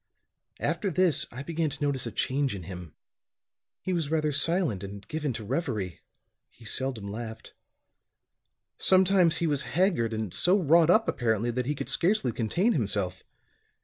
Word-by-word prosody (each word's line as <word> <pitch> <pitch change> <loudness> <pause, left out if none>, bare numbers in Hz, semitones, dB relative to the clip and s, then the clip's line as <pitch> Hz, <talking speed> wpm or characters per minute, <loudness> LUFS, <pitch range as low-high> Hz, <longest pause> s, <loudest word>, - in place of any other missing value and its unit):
"After 205 - -1
this 175 -4 +2
I 130 +3 -7
began 165 0 -1
to 145 +1 -6
notice 140 -4 -1
a - - -5
change 135 +3 -1
in 95 - -7
him. 90 -2 -9 0.9
He 185 - -1
was 165 -5 -1
rather 155 -1 +1
silent 150 - +1
and 100 +1 -8
given 155 -2 -2
to 110 - -6
reverie; 110 - -3 0.5
he 115 - -18
seldom 125 -3 -2
laughed. 110 +2 -7 1.3
Sometimes 185 -3 +4
he 170 - 0
was 145 -4 0 0.2
haggard 175 - +2
and 110 -4 -4
so 185 +3 +4
wrought 165 0 +4
up, 220 +5 +4
apparently, 115 0 0
that 125 +1 -2
he 150 - 0
could - - -5
scarcely 180 - +1
contain 175 - +1
himself. 100 - -1
140 Hz, 155 wpm, -28 LUFS, 110-170 Hz, 1.3 s, Sometimes